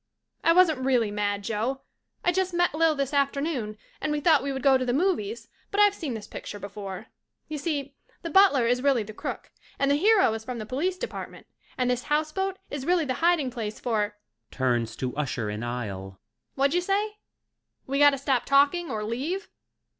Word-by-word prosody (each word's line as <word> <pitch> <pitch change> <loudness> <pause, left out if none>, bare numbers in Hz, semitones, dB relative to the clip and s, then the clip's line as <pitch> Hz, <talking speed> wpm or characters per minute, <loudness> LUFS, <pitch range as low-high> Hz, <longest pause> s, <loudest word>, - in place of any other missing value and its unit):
I 330 - +5
wasn't 335 -5 +5
really 245 -5 +2
mad, 205 -1 -1
Joe. 230 +6 -2 0.4
I 355 - +5
just 370 0 -1
met 350 -2 +2
Lil 320 0 +3
this 275 0 -2
afternoon 280 -5 0 0.2
and 305 - -1
we 300 - 0
thought 305 -2 +4
we 280 +1 -2
would 265 -1 -4
go 275 -2 +6
to 260 - +2
the 245 -1 0
movies 235 - 0 0.2
but 405 - -2
I've 410 -1 +6
seen 300 - -4
this 215 - -7
picture - - -7
before. 200 -1 -7 0.4
Y'see 290 -2 -3 0.3
the 335 - -4
butler 330 -9 +5
is 245 +1 +2
really 270 -5 +3
the 215 +1 -9
crook - - -6 0.3
and 275 0 +2
the - - +4
hero 385 - +4
is 220 0 -5
from 250 +1 -5
the 215 - -5
Police 330 - -1
Department 485 - -7 0.3
and 250 -1 +1
this 250 0 0
House 305 +1 +1
Boat 385 +3 -2
is 280 -2 -4
really 345 +1 +2
the 260 - -1
hiding 330 -6 +3
place 220 -3 -5
for 210 -3 -1 0.3
(Turns 120 -4 0
to 125 0 -4
usher 125 -7 -2
in 105 +1 -5
aisle.) 100 -6 -5 0.4
Whadja 280 +6 +2
say? 415 +3 -1 0.7
We 275 +1 -1
gotta 290 -1 +6
stop 265 -3 0
talk 280 +2 +5
ing 350 -1 -4
or 215 -1 -3
leave 280 - -3
270 Hz, 195 wpm, -26 LUFS, 215-325 Hz, 0.7 s, go